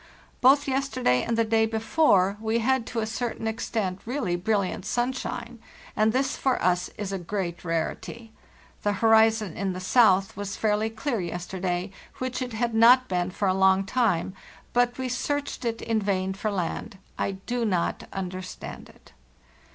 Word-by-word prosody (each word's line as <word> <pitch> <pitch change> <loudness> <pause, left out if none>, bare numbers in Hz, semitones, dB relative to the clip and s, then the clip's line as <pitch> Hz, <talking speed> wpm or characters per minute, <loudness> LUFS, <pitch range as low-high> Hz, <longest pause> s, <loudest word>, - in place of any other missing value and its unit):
Both 275 +3 +5
yesterday 260 - +1
and 230 -1 -1
the 230 - +4
day 220 0 +2
before 220 - +3
we 225 +1 0
had 245 +1 +1
to 230 - -2
a - - -1
certain 225 +1 -3
extent 215 -4 -2
really 235 -7 -1
brilliant 195 +1 -1
sunshine, 240 -1 -3 0.4
and 215 +1 +3
this 265 +3 0
for 265 -2 0
us 180 0 +1
is 205 -2 -4
a 195 - -2
great 175 -1 -4
rarity. 180 +7 -3 0.5
The 205 - +1
horizon 220 -2 +3
in 195 -1 -2
the 180 - -5
south 195 -1 +4
was 205 0 -4
fairly 215 0 +1
clear 225 +2 -2
yes 175 0 -4
terday, 180 0 -3 0.3
which 255 0 -3
it 250 -2 -4
had 235 +1 -1
not 245 +3 +6
been 180 -1 0
for 195 +2 -1
a 185 - +3
long 190 0 +4
time; 195 -7 +1 0.4
but 245 0 +2
we 260 0 -2
searched 280 +2 -2
it 230 -1 -2
in 225 -2 0
vain 190 -1 0
for 205 +3 -2
land. 195 0 -3 0.2
I 195 - 0
do 235 +6 -3
not 185 -6 -1
understand 185 -1 -6
it. - - -20
220 Hz, 165 wpm, -26 LUFS, 190-240 Hz, 0.5 s, not